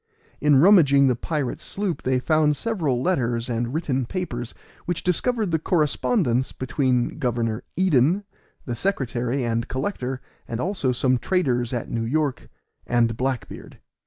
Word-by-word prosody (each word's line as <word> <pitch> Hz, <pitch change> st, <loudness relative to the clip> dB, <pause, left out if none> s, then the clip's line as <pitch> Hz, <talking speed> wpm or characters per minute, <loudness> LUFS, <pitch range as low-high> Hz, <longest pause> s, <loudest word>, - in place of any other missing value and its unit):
In 150 Hz, -1 st, +4 dB
rummaging 140 Hz, -4 st, +6 dB
the 130 Hz, -2 st, +3 dB
pirate's 145 Hz, +1 st, -3 dB
sloop, 195 Hz, -4 st, -3 dB
they 130 Hz, 0 st, +1 dB
found 150 Hz, +2 st, +2 dB
several 155 Hz, -, -1 dB
letters 120 Hz, -9 st, 0 dB
and 120 Hz, +1 st, -1 dB
written 135 Hz, -5 st, -1 dB
papers, 125 Hz, -10 st, -4 dB, 0.3 s
which 175 Hz, -2 st, -2 dB
discovered 215 Hz, +3 st, 0 dB
the 160 Hz, -, +1 dB
correspondence 150 Hz, -, +1 dB
between 130 Hz, -2 st, 0 dB
Governor 115 Hz, -2 st, -1 dB
Eden, 175 Hz, +1 st, +3 dB, 0.4 s
the 120 Hz, -, -3 dB
secretary 125 Hz, -, -1 dB
and 115 Hz, 0 st, -1 dB
collector, 130 Hz, -3 st, -3 dB, 0.3 s
and 115 Hz, -, -4 dB
also 175 Hz, -4 st, 0 dB
some 125 Hz, 0 st, +1 dB
traders 125 Hz, -9 st, 0 dB
at 120 Hz, -3 st, -4 dB
New 115 Hz, -, -1 dB
York, 140 Hz, +2 st, -1 dB, 0.4 s
and 115 Hz, -2 st, +2 dB
Black 130 Hz, 0 st, -2 dB
beard. -, -, -11 dB
130 Hz, 140 wpm, -24 LUFS, 120-165 Hz, 0.4 s, rummaging